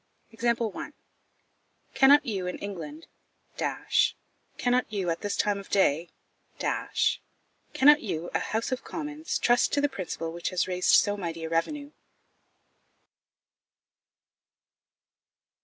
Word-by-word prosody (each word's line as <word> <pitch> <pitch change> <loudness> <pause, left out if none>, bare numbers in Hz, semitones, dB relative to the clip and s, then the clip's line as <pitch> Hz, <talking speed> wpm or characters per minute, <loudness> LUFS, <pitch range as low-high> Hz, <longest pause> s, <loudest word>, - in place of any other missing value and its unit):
Cannot 280 +2 +6
you, 195 -7 -2
in 180 - -4
England 205 - -7 1.5
cannot 250 -1 +1
you, 190 -5 -1
at 165 - -4
this 205 -1 -2
time 205 -1 +1
of 195 - -11
day 170 -4 +2 0.5
cannot 295 +2 +1
you, 175 -5 -4
a - - +2
House 225 +4 -2
of 255 - -2
Commons, 305 0 -4
trust 240 0 +3
to 285 - +3
the 290 - +3
principle 180 - -5
which 170 0 -3
has 185 -1 0
raised 180 -1 +3
so 205 - +4
mighty 165 -4 -5
a 160 - -4
revenue? 285 - -2
205 Hz, 105 wpm, -27 LUFS, 175-275 Hz, 1.5 s, Cannot